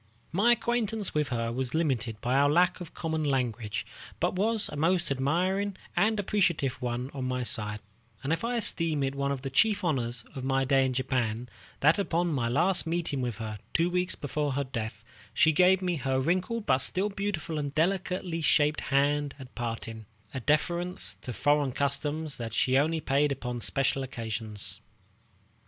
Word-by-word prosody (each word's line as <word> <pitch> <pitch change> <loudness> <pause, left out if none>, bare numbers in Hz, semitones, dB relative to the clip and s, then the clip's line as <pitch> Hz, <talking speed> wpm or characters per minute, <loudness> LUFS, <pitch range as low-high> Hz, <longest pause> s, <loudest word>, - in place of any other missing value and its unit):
My 210 +8 +5
acquaintance 225 -3 -1
with 150 -1 +1
her 115 -3 -2
was 130 +3 -1
limited 120 -9 0
by 125 - 0
our 140 +1 +4
lack 175 +4 +3
of 170 - -9
common 160 -1 -2
language, 120 -7 -1 0.3
but 175 - +1
was 215 +3 +1
a - - -7
most 170 +2 +1
admiring 185 +9 0 0.2
and 215 0 +2
appreciative 170 -10 +1
one 125 +2 -3
on 135 -2 -4
my 125 0 -1
side; 105 -2 +1 0.4
and 140 +4 +1
I 235 +8 -1
esteem 165 -9 +1
it 135 0 -1
one 140 0 -1
of 135 -1 -3
the 135 - -4
chief 210 +9 +3
honors 125 -7 -1
of 130 - -6
my 135 0 +1
stay 135 0 +3
in 130 - -2
Japan, 125 -2 -1 0.3
that 155 +8 +5
upon 175 -3 0
my 120 -4 0
last 175 +7 +2
meeting 165 -5 -1
with 120 -3 -2
her, 110 -2 -5 0.2
two 170 +2 +3
weeks 180 0 +1
before 145 0 -2
her 140 +1 0
death, 115 -4 -5 0.3
she 160 - +5
gave 185 +4 +4
me 180 -2 0
her 130 -1 0
wrinkled 185 - 0
but 130 - +3
still 185 +10 0
beautiful 195 -6 -3
and 145 -1 -4
delicately 180 0 0
shaped 150 0 +3
hand 145 +1 +1
at 130 -2 -11
parting, 115 -2 -5 0.3
a 130 - -3
deference 170 +6 0
to 125 - -6
foreign 145 +4 +2
customs 145 +2 -1
that 115 -2 -5
she 130 - +2
only 155 +4 +2
paid 145 +1 +2
upon 125 -3 -4
special 135 +2 +1
occasions. 110 -5 -6
145 Hz, 175 wpm, -29 LUFS, 130-175 Hz, 0.4 s, My